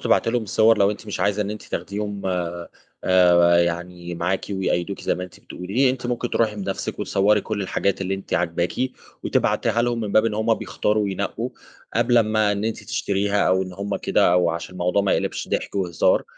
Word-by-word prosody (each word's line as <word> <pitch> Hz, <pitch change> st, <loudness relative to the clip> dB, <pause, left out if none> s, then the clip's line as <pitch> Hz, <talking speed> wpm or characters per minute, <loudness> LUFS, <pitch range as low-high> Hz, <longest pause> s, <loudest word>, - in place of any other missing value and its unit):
تبعتي -, -, +2 dB
لهم 120 Hz, -1 st, 0 dB
الصور، 110 Hz, +2 st, +3 dB
لو 100 Hz, 0 st, +4 dB
أنتِ 105 Hz, +1 st, -7 dB
مش 105 Hz, -, -4 dB
عايزة 105 Hz, +1 st, +1 dB
إن 100 Hz, -, -4 dB
أنتِ 105 Hz, -, -6 dB
تاخديهم 100 Hz, -1 st, -4 dB
آآ، 85 Hz, -2 st, -3 dB, 0.4 s
آآ 85 Hz, -2 st, +5 dB
يعني 85 Hz, 0 st, -4 dB
معاكِ، 90 Hz, +3 st, -1 dB
ويقيّدوكِ 95 Hz, -1 st, -1 dB
زي -, -, 0 dB
ما 90 Hz, -, -4 dB
أنتِ 90 Hz, -, -14 dB
بتقولي. 115 Hz, +9 st, 0 dB
أنتِ 130 Hz, -1 st, -4 dB
ممكن 120 Hz, 0 st, -2 dB
تروحي 110 Hz, -2 st, +1 dB
بنَفْسِك 95 Hz, -1 st, -4 dB
وتصوري 105 Hz, +2 st, +2 dB
كُلّ 105 Hz, -1 st, -3 dB
الحاجات 100 Hz, +1 st, -1 dB
اللي 95 Hz, 0 st, -1 dB
أنتِ 95 Hz, -, -5 dB
عاجباكِ، 85 Hz, +1 st, 0 dB, 0.5 s
وتبعتيها 115 Hz, -, +1 dB
لهم 120 Hz, -1 st, 0 dB
من 105 Hz, -3 st, -3 dB
باب 110 Hz, -, +5 dB
إن 110 Hz, -2 st, 0 dB
هُم 110 Hz, +1 st, +2 dB
بيختاروا 105 Hz, -1 st, -1 dB
وينقّوا، 100 Hz, -1 st, -3 dB, 0.4 s
قبل 120 Hz, -1 st, +4 dB
أما 110 Hz, -2 st, +2 dB
إن 100 Hz, +1 st, -2 dB
أنتِ 110 Hz, -1 st, -3 dB
تشتريها 100 Hz, -2 st, 0 dB
أو 95 Hz, +1 st, +3 dB
إن 95 Hz, -, -7 dB
هُم 100 Hz, +2 st, -3 dB
كده، -, -, +2 dB
أو 90 Hz, -1 st, +3 dB
عشان 85 Hz, +2 st, -5 dB
الموضوع 90 Hz, +2 st, +1 dB
ما 100 Hz, -, +2 dB
يقلبش -, -, -2 dB
ضحك -, -, -2 dB
وهزار 90 Hz, -4 st, +2 dB
100 Hz, 195 wpm, -23 LUFS, 90-110 Hz, 0.5 s, آآ